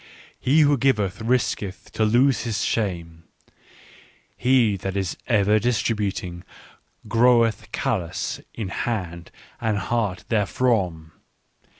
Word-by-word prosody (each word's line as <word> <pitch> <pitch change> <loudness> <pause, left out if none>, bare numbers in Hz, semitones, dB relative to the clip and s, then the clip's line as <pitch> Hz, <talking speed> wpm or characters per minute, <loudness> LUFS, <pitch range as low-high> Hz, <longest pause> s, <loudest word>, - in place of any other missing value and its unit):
" - - -28
He 155 +2 +6
who 145 -2 +4
giveth 110 -7 +1
risketh 110 -5 -1
to 110 - 0
lose 120 +5 +3
his 110 -4 -2
shame; 85 -6 -2 1.1
he 125 -5 +3
that 95 +1 -4
is 95 -3 -2
ever 105 -2 +3
distributing 105 -6 -1 0.6
groweth 115 -1 +3
callous 95 -11 -2
in 105 -5 -4
hand 90 -7 -4 0.3
and 110 -3 0
heart 100 -1 -1
therefrom. 100 -7 0
110 Hz, 105 wpm, -23 LUFS, 95-120 Hz, 1.1 s, He